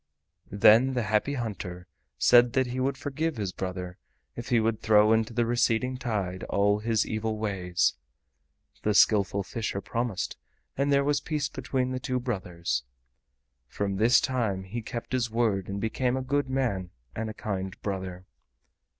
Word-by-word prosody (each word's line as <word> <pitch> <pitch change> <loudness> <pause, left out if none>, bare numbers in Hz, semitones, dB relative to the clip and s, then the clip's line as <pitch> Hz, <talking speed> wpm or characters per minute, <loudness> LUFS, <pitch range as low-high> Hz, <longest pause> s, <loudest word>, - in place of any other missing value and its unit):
Then 115 +6 +5
the 120 - +1
Happy 110 +7 0
Hunter 95 -7 -5 0.3
said 120 -1 +5
that 130 -1 +3
he 125 +1 -4
would 135 +1 0
forgive 155 +2 -2
his 100 -4 -2
brother 90 -1 -5 0.4
if 120 - -7
he 120 - +4
would 110 0 0
throw 105 0 +5
into 110 0 +1
the 120 0 +1
receding 120 +1 +1
tide 100 -7 -3
all 100 +1 +2
his 110 0 +1
evil 110 0 -2
ways. 95 -5 0 0.9
The 105 -1 +1
Skillful 100 -2 +4
Fisher 105 0 -3
promised 115 -1 -3 0.4
and 140 +1 +1
there 140 0 +4
was 145 0 +1
peace 150 -3 -2
between 130 0 -2
the 130 - -2
two 130 -2 -2
brothers. 90 - -2 0.9
From 100 +4 -2
this 115 +4 +5
time 115 -8 -1
he 110 +5 -5
kept 115 +1 -6
his 125 -2 0
word 110 -5 0
and 100 0 -3
became 125 +4 0
a 130 - -2
good 140 +1 0
man 120 -9 -1 0.3
and 110 0 -3
a - - -5
kind 95 -3 -4
brother. 95 -2 -4
110 Hz, 160 wpm, -27 LUFS, 100-125 Hz, 0.9 s, Then